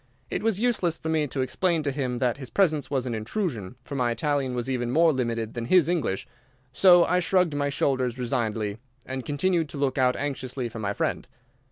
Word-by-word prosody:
It - - -1
was 220 -3 0
useless 210 -9 +1
for 160 - -5
me 155 -2 +1
to 135 0 -2
explain 165 +5 0
to 145 - 0
him 130 -3 -2
that 125 0 0
his 130 -4 -7
presence 155 - +1
was 135 -3 -1
an 125 - -2
intrusion, 110 - -3
for - - -9
my 125 -3 +1
Italian 140 0 -1
was 120 0 -2
even 125 -2 -1
more 160 +4 +4
limited 115 -4 -2
than 120 -1 -4
his 175 +3 +4
English, 165 - -1 0.5
so 175 +4 +7
I 180 - +2
shrugged 180 -2 +2
my 145 0 0
shoulders 130 -3 0
resignedly, 110 -3 -2 0.3
and 130 0 -4
continued 160 +3 0
to 145 - -7
look 140 -1 0
out 125 -1 +3
anxiously 130 -3 -3
for 115 - -8
my 100 -2 -1
friend. - - -2
135 Hz, 205 wpm, -26 LUFS, 120-160 Hz, 0.5 s, so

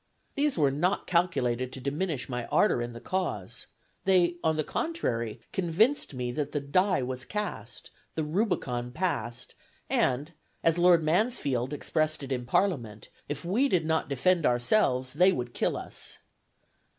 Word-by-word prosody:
These 290 -3 +1
were 145 -4 +3
not 175 +8 0
calculated 130 -8 +1
to - - -6
diminish 145 +2 -2
my 125 -2 -4
ardor 120 - +3
in 120 0 -4
the 115 - -8
cause; 185 +8 -3 0.4
they, 175 -2 +3
on 160 -1 +2
the 155 - +1
contrary, 120 - -2
convinced 190 - +1
me 125 -1 -2
that 145 +2 -3
the 145 - +1
die 185 +3 +2
was 125 0 -3
cast, 210 +8 -5 0.2
the 160 - 0
Rubicon 150 - -1
passed, 125 -8 -2 0.4
and, 140 +6 +1 0.3
as 165 +1 +3
Lord 175 -2 +6
Mansfield 155 - +1
expressed 155 +1 -1
it 135 - -7
in 125 -2 -2
Parliament, 120 - 0 0.2
if 145 +3 -4
we 235 +11 +2
did 175 -7 +2
not 160 -1 0
defend 165 +6 +2
ourselves, 125 - +2
they 180 +6 +5
would 125 -8 -3
kill - - 0
us. - - -6
155 Hz, 150 wpm, -28 LUFS, 125-180 Hz, 0.4 s, Lord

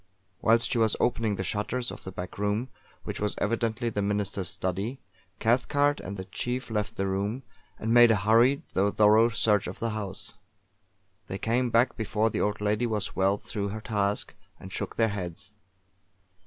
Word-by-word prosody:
Whilst 115 +1 +4
she 120 - +1
was 110 -2 +3
opening 115 -3 +1
the 95 - -3
shutters 105 +6 -2
of - - -9
the 95 - -5
back 90 +1 -7
room, 105 +5 0 0.3
which - - -5
was 105 0 -1
evidently 115 +2 -1
the 105 -2 -2
Minister's 100 -2 -1
study, 95 +8 -3 0.4
Cathcart 145 +5 +2
and 100 - -6
the 95 - -6
chief 125 +6 -4
left 105 -1 -2
the 95 - -1
room, 100 +6 -2 0.3
and 110 +1 -1
made 120 -1 +8
a 110 - +5
hurried, 115 +7 +4
though 100 +2 +2
thorough, 110 +3 +5
search 105 -2 +2
of - - -6
the 115 0 -2
house. 105 -1 -4 0.9
They 95 - -4
came 120 +4 +1
back 115 +2 +3
before 110 0 0
the - - -1
old 105 0 -1
lady 105 +3 +1
was 105 -3 -2
well 95 +1 +2
through 100 -1 -4
her 110 +2 -5
task, 105 -2 -1 0.3
and 95 0 -10
shook - - -4
their 115 -1 +3
heads. 90 -1 -6
105 Hz, 180 wpm, -28 LUFS, 100-115 Hz, 0.9 s, made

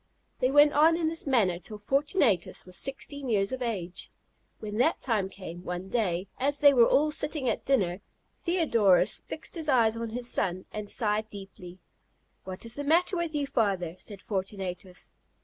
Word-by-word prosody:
They 255 - +2
went 290 +2 +6
on 320 +3 +5
in 330 -2 0
this 325 -2 -4
manner 200 -10 +2
till 210 +3 -8
Fortunatus 270 - +1
was 185 0 -11
sixteen 275 +2 -5
years 200 -3 +1
of 260 0 -4
age. 190 -7 -4 0.5
When 210 0 -5
that 315 +7 +2
time 215 -7 0
came, 175 -3 -9
one 180 +2 -5
day, 190 -5 -1
as 280 +2 +2
they 285 -1 +7
were 240 -3 +6
all 300 +2 +3
sitting 300 -3 -2
at - - -1
dinner, 200 -9 +1 0.4
Theodorus 235 - +3
fixed - - -8
his 320 -3 -2
eyes 230 -4 +4
on 230 0 -4
his 240 +2 -4
son, 185 -5 -1
and 210 -1 -6
sighed 215 0 +1
deeply. 195 -3 -11 0.7
"What 185 +3 -7
is 230 - 0
the 285 - -3
matter 335 +6 +2
with 340 -3 -2
you, 290 -1 0
father?" 195 -10 0
said 200 -3 -9
Fortunatus. 190 -2 -5
225 Hz, 175 wpm, -28 LUFS, 190-285 Hz, 0.7 s, they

